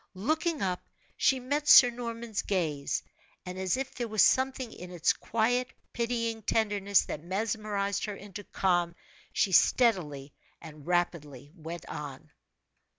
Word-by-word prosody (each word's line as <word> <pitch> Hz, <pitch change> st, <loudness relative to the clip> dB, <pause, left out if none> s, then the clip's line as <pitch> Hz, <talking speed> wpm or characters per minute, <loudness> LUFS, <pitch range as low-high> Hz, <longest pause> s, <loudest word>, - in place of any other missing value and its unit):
Looking 310 Hz, -, -1 dB
up 180 Hz, -2 st, -1 dB, 0.3 s
she 265 Hz, -, +2 dB
met 285 Hz, +4 st, -2 dB
Sir 245 Hz, -3 st, +9 dB
Norman's 235 Hz, -2 st, -4 dB
gaze, 155 Hz, -8 st, -1 dB, 0.4 s
and 180 Hz, +1 st, -6 dB
as 190 Hz, +5 st, 0 dB
if 270 Hz, 0 st, -4 dB
there 240 Hz, -2 st, -3 dB
was 215 Hz, -2 st, +3 dB
something 260 Hz, -2 st, +1 dB
in 180 Hz, -, -9 dB
its 175 Hz, -2 st, +1 dB
quiet, 245 Hz, +3 st, 0 dB, 0.2 s
pitying 230 Hz, -1 st, -2 dB
tenderness 205 Hz, -2 st, +2 dB
that 150 Hz, -, -6 dB
mesmerized 200 Hz, +1 st, -2 dB
her 210 Hz, -2 st, -5 dB
into 205 Hz, 0 st, -9 dB
calm, 175 Hz, -2 st, 0 dB, 0.4 s
she 195 Hz, -, +1 dB
steadily 160 Hz, -, +2 dB, 0.3 s
and 155 Hz, -2 st, -12 dB
rapidly 150 Hz, -6 st, -2 dB
went 165 Hz, 0 st, -8 dB
on. 150 Hz, +1 st, -8 dB
200 Hz, 135 wpm, -29 LUFS, 175-235 Hz, 0.4 s, Sir